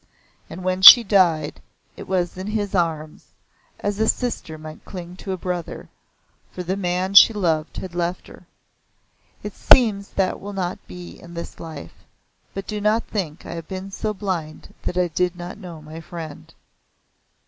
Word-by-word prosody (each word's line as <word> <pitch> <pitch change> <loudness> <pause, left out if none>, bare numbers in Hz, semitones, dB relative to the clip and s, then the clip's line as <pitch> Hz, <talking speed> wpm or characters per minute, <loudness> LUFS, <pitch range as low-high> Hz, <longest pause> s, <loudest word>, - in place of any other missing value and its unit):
And 175 +3 -8
when 185 0 -1
she 235 +5 +12
died, 170 - +2 0.3
it - - -10
was 180 -2 -1
in 185 +2 -6
his 210 -2 -2
arms, 160 -4 -2 0.6
as 205 0 -2
a 220 - +2
sister 225 -12 -2
might 155 0 -11
cling 180 -2 -9
to 195 - -6
a 185 - -2
brother, 180 -2 -5 0.6
for 180 - -6
the 185 +2 -2
man 185 0 -1
she 200 +3 +9
loved 165 -6 -1
had 185 -2 -6
left 175 +1 -2
her. - - -15 1.0
It 210 - -6
seems 210 -5 +4
that 190 -1 0
will 205 +1 -7
not 185 -2 -3
be 180 -1 -10
in 170 0 -12
this 170 - -7
life, 160 -3 -9 0.6
but 195 0 -5
do 210 -1 -4
not 215 +2 +2
think 170 -8 -5
I - - -7
have 165 -1 -7
been 190 +1 -6
so 215 +2 -3
blind 185 -7 -5
that 180 - -3
I 180 -1 +2
did 180 +2 0
not 175 +1 -8
know 170 -4 -10
my 155 +1 -9
friend." 160 -2 -9
180 Hz, 170 wpm, -22 LUFS, 170-195 Hz, 1.0 s, she